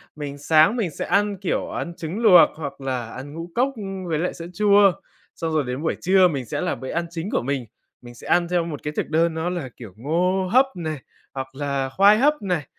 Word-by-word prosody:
Mình 145 -1 -6
sáng 155 +7 +4
mình 215 -8 -1
sẽ - - -5
ăn, 205 0 +1
kiểu, 190 -1 -2
ăn 170 - -4
trứng 170 +7 -5
luộc 210 -6 +7
hoặc 140 -3 -7
là 130 -3 -3
ăn 140 +3 -8
ngũ 165 +2 -7
cốc, 255 +3 +2
ưm, 195 -4 -6
với 160 -2 -1
lại 180 - -1
sữa 170 0 -8
chua, 205 -1 +5 0.4
xong 165 -1 -3
rồi 155 -2 +2
đến 125 +3 -4
buổi 160 - 0
trưa 185 0 +5
mình 140 -7 -3
sẽ - - -4
là - - -1
bữa 130 - -8
ăn 170 0 -1
chính 170 +3 -5
của - - +1
mình, 135 -1 -2 0.4
mình 120 0 -12
sẽ - - -12
ăn 175 -1 +3
theo 175 -1 0
một 150 -4 -6
cái 150 0 -4
thực - - -2
đơn 165 +1 +2
nó 160 +2 -2
là, 170 -8 -4
kiểu, 110 -7 -10
ngô 180 +8 0
hấp 260 +3 +6
này, 155 -4 -4 0.4
hoặc 130 0 -6
là 140 -2 -2
khoai 200 +9 +5
hấp 295 0 +2
này, 180 -8 -1
165 Hz, 240 wpm, -23 LUFS, 140-190 Hz, 0.4 s, luộc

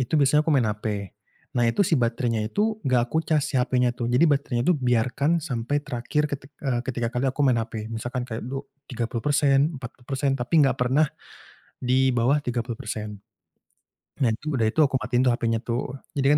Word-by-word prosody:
itu 125 - -3
biasanya 145 +1 +4
aku 155 - -6
main 135 -5 +4
HP, 105 -2 -3 0.4
nah 120 - +2
itu 200 +12 +2
si - - +2
baterainya 115 -1 0
itu 215 - 0
gak 125 -4 +2
aku 160 - +3
cas 155 -3 +1
si - - -7
HP-nya 125 -1 +2
tuh, 120 -1 -3
jadi 125 +7 +4
baterainya 140 -5 +1
tuh 180 - +5
biarkan 125 +6 +1
sampai 145 -3 -2
terakhir 130 +4 -1
ketik 135 0 -5
eee, 125 -3 +1
ketika 120 -2 -3
kali 125 +2 0
aku 135 - -7
main 125 -3 +3
HP. 110 -1 -6
Misalkan 120 +2 -3
kayak 110 -2 -5
du 135 +3 -5 0.2
30%, 135 +5 +1
40%, 130 +2 -3
tapi 125 +4 -3
nggak 130 - +2
pernah 130 +4 +2 0.8
di 130 +1 +3
bawah 125 +5 +3
30%, 110 -4 -4 1.0
nah 125 -5 +3
tuh 155 +4 -4
udah 110 - +3
itu 160 - -3
aku 140 -2 +1
matiin 125 +2 +1
tuh - - +5
HP-nya 115 -2 0
tuh, 120 +1 -1 0.3
jadi 140 +1 +3
125 Hz, 185 wpm, -25 LUFS, 120-140 Hz, 1.0 s, tuh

